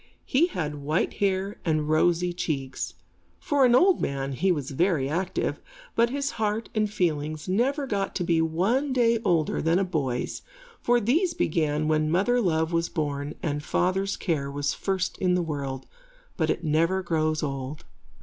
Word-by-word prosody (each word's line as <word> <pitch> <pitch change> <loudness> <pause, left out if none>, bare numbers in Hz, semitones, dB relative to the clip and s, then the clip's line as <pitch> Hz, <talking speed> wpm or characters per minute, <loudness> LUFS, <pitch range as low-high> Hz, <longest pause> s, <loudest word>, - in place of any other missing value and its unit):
He 295 +6 +3
had 150 - -4
white 150 +4 0
hair 195 0 0
and 155 -2 0
rosy 175 +3 +2
cheeks. 130 - -3 0.4
For 280 -2 +2
an 245 -1 +5
old 365 +6 +5
man, 135 0 -2
he 180 +8 +1
was 145 -5 -2
very 160 -2 +1
active, 180 +5 -1 0.3
but 235 +1 +3
his 280 +2 -2
heart 215 +1 -1
and 215 -2 0
feelings 155 -5 -1
never 265 +10 +1
got 200 -6 -2
to 180 - -1
be 170 -1 +2
one 205 - +1
day 235 -2 +3
older 165 -3 +1
than 165 +2 +2
a 195 - +2
boy's, 140 -9 -2 0.4
for 240 0 +3
these 325 - +1
began 155 -1 0
when 155 0 +2
mother 205 +9 +2
love 160 -4 +1
was 165 0 +1
born 145 -1 -3
and 145 -3 -1
father's 190 +4 0
care 150 -6 -1
was 140 0 -1
first 190 -1 -2
in 180 -1 +2
the 180 - +1
world, 140 -4 -4 0.5
but 160 -2 0
it 170 - -1
never 165 +4 +1
grows 155 -2 0
old. 135 0 -4
170 Hz, 170 wpm, -26 LUFS, 150-200 Hz, 0.5 s, an